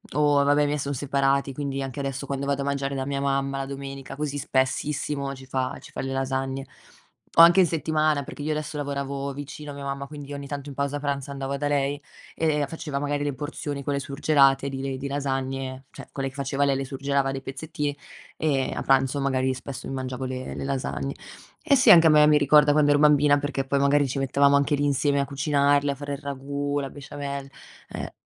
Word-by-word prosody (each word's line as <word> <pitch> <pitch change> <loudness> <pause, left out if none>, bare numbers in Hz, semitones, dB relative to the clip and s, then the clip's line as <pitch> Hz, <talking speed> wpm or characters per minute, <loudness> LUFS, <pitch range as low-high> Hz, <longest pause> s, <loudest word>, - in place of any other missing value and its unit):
o 145 -1 +4
vabbè, 145 +1 +4
i - - +3
miei 145 0 -1
sono 140 0 -2
separati, 140 0 +1
quindi 140 -1 -3
anche 135 +1 -6
adesso 135 0 -3
quando 140 0 -3
vado 140 0 0
a - - -2
mangiare 140 0 -1
da 130 0 -2
mia 140 0 -2
mamma 135 0 0
la 135 - -2
domenica 135 -1 -7
così 145 -1 -3
spessissimo 140 +1 -1
ci 130 0 -12
fa 130 -1 -2
ci - - -13
fa - - -7
le 135 0 -3
lasagne. 135 0 -2 0.7
O - - +12
anche 175 +3 +7
in 180 - +6
settimana, 155 -2 +1
perché 145 - -9
io 155 - -3
adesso 155 0 -3
lavoravo 140 -1 -3
vicino 145 +1 -8
a - - -8
mia 140 - -7
mamma, 140 0 -4
quindi 145 -1 -8
ogni 140 0 -6
tanto 145 0 -5
in 135 - -9
pausa 140 +1 -1
pranzo 140 -1 -3
andavo 135 0 -3
da 145 +1 -1
lei, 145 0 0 0.3
e 150 -3 +1
faceva 150 -3 -5
magari 145 0 -1
le 145 -1 -1
porzioni, 145 0 -5
quelle 140 0 -1
surgelate 140 -1 +3
di 135 0 -5
le 135 -1 -3
di 140 +1 -4
lasagne, 135 -1 -3
cioè - - -11
quelle 135 -1 -3
che 135 - -18
faceva 140 0 0
lei 135 -1 +2
le 135 0 -2
surgelava 140 0 -1
dei 135 0 -4
pezzettini, 145 +1 -4 0.4
e 140 -4 0
a - - -3
pranzo 135 +1 +2
magari 130 -1 +1
spesso 130 0 -7
mi - - -5
mangiavo 130 0 -4
le 130 0 -5
le - - -5
lasagne. 135 0 -2 0.5
Eh 295 -3 +4
sì, 250 - +7
anche 165 -1 +8
a - - +6
me 150 0 +7
mi 150 -1 +6
ricorda 145 +1 +5
quando 145 0 +4
ero 145 - +4
bambina, 145 -1 +5
perché 140 -1 -2
poi 140 +1 0
magari 140 0 +3
ci 130 - -4
mettevamo 140 +1 +3
anche 140 +1 +2
lì 145 +1 0
insieme 140 0 +2
a 140 - +1
cucinarle, 140 0 +2
a - - -4
fare 145 +1 -5
il 140 - -5
ragù, 140 0 -3
la 135 - -4
besciamell 140 -1 -6 0.4
eh. - - -6
140 Hz, 220 wpm, -25 LUFS, 135-145 Hz, 0.7 s, O